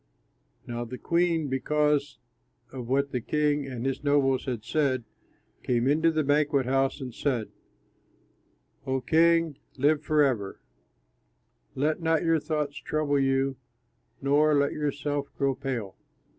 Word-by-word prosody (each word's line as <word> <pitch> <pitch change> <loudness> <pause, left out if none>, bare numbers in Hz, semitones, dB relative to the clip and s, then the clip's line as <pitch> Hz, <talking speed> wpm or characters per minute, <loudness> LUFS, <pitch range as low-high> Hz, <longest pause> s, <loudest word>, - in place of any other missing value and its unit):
Now 120 0 -4
the 125 +2 -7
queen, 170 0 +1
because 145 +2 0 0.5
of 125 -3 -7
what 140 +1 +1
the 125 - -2
king 150 +2 0
and 125 -2 -5
his 135 +1 -2
nobles 140 -2 +2
had 120 -5 -3
said, 135 -4 0 0.6
came 120 0 0
into 160 +4 +3
the 155 -1 0
banquet 145 -1 +2
house 135 +2 +1
and 130 -3 -6
said, 125 -6 -1 1.4
"O 130 0 0
king, 165 +2 +3 0.2
live 145 +3 +3
forever; 135 -11 +1 1.2
let 150 +5 0
not 160 0 +1
your 165 -1 +3
thoughts 150 -2 -3
trouble 150 -2 0
you 135 0 +1 0.7
nor 150 +2 +4
let 140 0 +2
yourself 145 -1 -2
grow 140 -1 +1
pale. 130 -8 -4
140 Hz, 130 wpm, -27 LUFS, 130-150 Hz, 1.4 s, nor